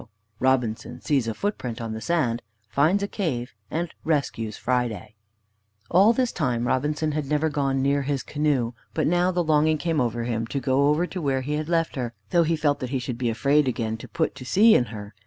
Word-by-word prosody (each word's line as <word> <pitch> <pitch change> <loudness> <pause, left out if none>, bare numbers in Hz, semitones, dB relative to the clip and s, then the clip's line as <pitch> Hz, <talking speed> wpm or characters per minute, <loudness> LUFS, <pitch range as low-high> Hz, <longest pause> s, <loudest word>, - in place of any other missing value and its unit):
V - - -17 0.3
ROBINSON 125 -2 0
SEES 135 -6 +1
A 110 - -2
FOOTPRINT 130 - -3
ON 115 -1 -4
THE 110 - -6
SAND, 120 -4 0 0.3
FINDS 160 - +2
A - - 0
CAVE, 135 - -3 0.2
AND 170 +1 -3
RESCUES 135 -8 -1
FRIDAY 115 -4 -1 0.8
All 195 +6 +6
this 250 +1 +1
time 125 -7 -1
Robinson 150 +5 0
had 150 -2 -2
never 150 +2 +1
gone 135 -2 0
near 140 +1 +2
his 140 -1 -2
canoe, 145 -6 0 0.2
but 155 - +1
now 175 +2 +3
the 180 -1 0
longing 155 0 +3
came 165 -1 0
on 120 -2 +1
him 115 -1 -2
to 140 - -2
go 135 +2 +2
over 150 +4 +2
to 180 0 -6
where 135 -3 0
he 145 +3 -3
had 155 +1 -2
left 165 -3 0
her, 120 -2 -3 0.2
though 170 - +4
he 165 0 +2
felt 150 -2 +1
that 130 - -4
he 135 - -1
should 125 -1 -4
be 120 -2 0
afraid 140 +6 +2
again 115 -3 -1
to - - -10
put 165 -2 -1
to - - -10
sea 210 - +5
in 120 - +4
her. 105 -2 -9
140 Hz, 215 wpm, -25 LUFS, 120-160 Hz, 0.8 s, All